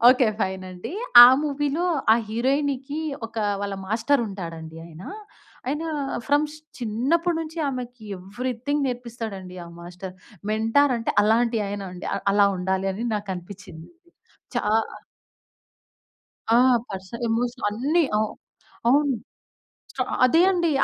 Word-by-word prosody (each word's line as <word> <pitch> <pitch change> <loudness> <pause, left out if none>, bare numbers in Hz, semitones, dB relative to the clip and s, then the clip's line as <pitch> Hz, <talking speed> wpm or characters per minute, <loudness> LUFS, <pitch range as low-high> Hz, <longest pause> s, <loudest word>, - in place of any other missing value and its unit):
Okay. 250 -1 +5
Fine 190 0 -1
అండి. 180 - -7 0.3
ఆ - - +11 0.2
మూవీలో 290 +3 -1 0.3
ఆ - - +7
హీరోయిన్‌కి 275 +4 -1 0.3
ఒక 225 - -21 0.2
వాళ్ళ 200 -1 -3
మాస్టరు 235 +6 +2
ఉంటాడండి 165 -4 -7
ఆయన. 165 +1 -12 0.6
ఆయన 295 +5 -1 0.4
ఫ్రమ్స్ 295 +1 +2 0.2
చిన్నప్పటి 275 +10 0
నుంచి 320 +1 -6
ఆమెకి 250 -3 -6
ఎవ్రీథింగ్ 250 +8 -2
నేర్పిస్తాడండి 225 -7 -6
ఆ - - -11
మాస్టరు. 180 +2 -8 0.4
మెంటార్ 225 +6 +3
అంటే 230 - -2
అలాంటి 230 +2 +3
ఆయనండి 195 -3 -6
అ - - 0 0.2
అలా 205 0 +5
ఉండాలని 190 +4 -1
నాకనిపిచ్చిందండి. 190 - -7 0.6
చా - - +2 2.0
ఆ! - - +6 0.3
పర్సనల్ 195 +5 -6
ఎమోషన్ 240 +2 -1
అన్ని 295 +10 +2
అ - - +2 0.7
అవును. 285 +1 +4 0.9
అ - - +3 0.2
అదే 325 +7 +4
అండి. 345 -3 +1
230 Hz, 110 wpm, -24 LUFS, 195-280 Hz, 2.0 s, ఆ